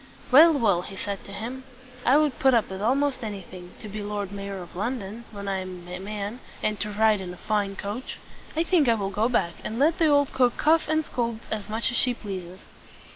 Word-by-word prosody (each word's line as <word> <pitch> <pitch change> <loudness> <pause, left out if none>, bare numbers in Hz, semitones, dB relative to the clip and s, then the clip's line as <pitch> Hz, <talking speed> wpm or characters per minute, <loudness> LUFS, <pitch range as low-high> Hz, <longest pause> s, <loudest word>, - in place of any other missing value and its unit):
"Well, 320 +5 +9
well!" 215 - +3
he 195 - -9
said 200 0 -4
to - - -10
himself. 240 +6 -6 0.4
"I 265 +4 +7
would 300 -3 +1
put 265 -2 +5
up 225 -4 +1
with 190 0 -5
almost 265 +3 +1
anything, 185 -4 -8
to 215 - -7
be 210 +1 -5
Lord 205 -1 -3
Mayor 200 -1 -5
of 175 - -14
London 225 +1 -4
when 200 -2 -7
I 195 -1 0
am 185 -2 -7
a 180 0 -6
man, 205 +3 -5 0.2
and 215 -1 0
to 210 - -2
ride 210 -1 +3
in 180 -1 -6
a 180 - -10
fine 205 -1 -1
coach! 210 +6 -5 0.4
I 325 - +3
think 330 -7 +3
I 230 - +5
will 200 -2 -2
go 215 +4 +1
back 170 -8 +1
and 220 - -4
let 305 +5 +3
the 325 - +5
old 285 -2 +3
cook 250 -2 +3
cuff 320 +2 +3
and 315 0 +1
scold 235 -4 -2
as 210 -1 -3
much 225 +4 0
as 240 - 0
she 250 -1 +4
pleases." 185 -4 -7
215 Hz, 230 wpm, -26 LUFS, 195-255 Hz, 0.4 s, Well